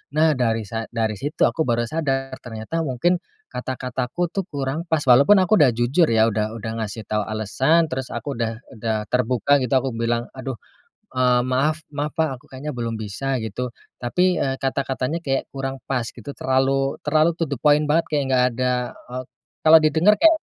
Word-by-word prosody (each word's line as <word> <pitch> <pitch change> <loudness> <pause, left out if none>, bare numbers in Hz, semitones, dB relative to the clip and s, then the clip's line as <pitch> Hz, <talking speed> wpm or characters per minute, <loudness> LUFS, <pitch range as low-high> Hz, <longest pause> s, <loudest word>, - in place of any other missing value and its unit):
Nah, 155 +1 +4
dari 115 -2 +1
sa 110 +2 -5
dari 110 -3 -2
situ 145 +2 -1
aku 160 -4 +1
baru 120 0 +1
sadar, 135 0 -2
ternyata 110 +7 -5
mungkin 165 +4 +1 0.3
kata-kataku 130 +6 -3
tuh, 195 -2 -3
kurang 145 +3 -3
pas. 160 -2 +1
Walaupun 140 +10 +6
aku 185 +1 +3
udah 130 -6 +5
jujur 130 +9 +3
ya, 115 0 +3
udah 110 +1 -2
udah 110 0 -5
ngasih 110 0 -4
tahu 105 -1 -2
alasan, 130 - +1
terus 130 0 -3
aku 120 +2 -5
udah 115 -1 -1 0.2
udah 110 -1 -2
terbuka, 125 +3 +2
gitu. 130 0 -2
Aku 130 0 +1
bilang, 115 +1 -2
"Aduh, 130 -1 -5 0.6
eee, 125 -1 +3
maaf 150 +5 +1
maaf, 145 +1 -2
Pak, 160 0 +3
aku - - -27
kayaknya 140 +1 -6
belum 115 -1 -2
bisa." 125 +6 -2
gitu. 115 +3 -4 0.3
Tapi, 180 +9 +2
eee, 135 -1 0
kata-katanya 135 +3 -2
kayak 135 -1 -1
kurang 135 0 -4
pas, 130 -3 0
gitu. 120 +3 -9
Terlalu 135 +1 +1
terlalu 155 +2 +4
to 165 - +3
the 140 - -1
point 150 0 +4
banget 165 +2 +3
kayak 145 - +2
enggak 125 -1 +4
ada 125 +1 +1 0.4
eee, 125 +1 -4 0.4
kalau 160 +1 +9
didengar 160 +7 +4
kayak 325 -1 +6
130 Hz, 180 wpm, -22 LUFS, 115-150 Hz, 0.6 s, kalau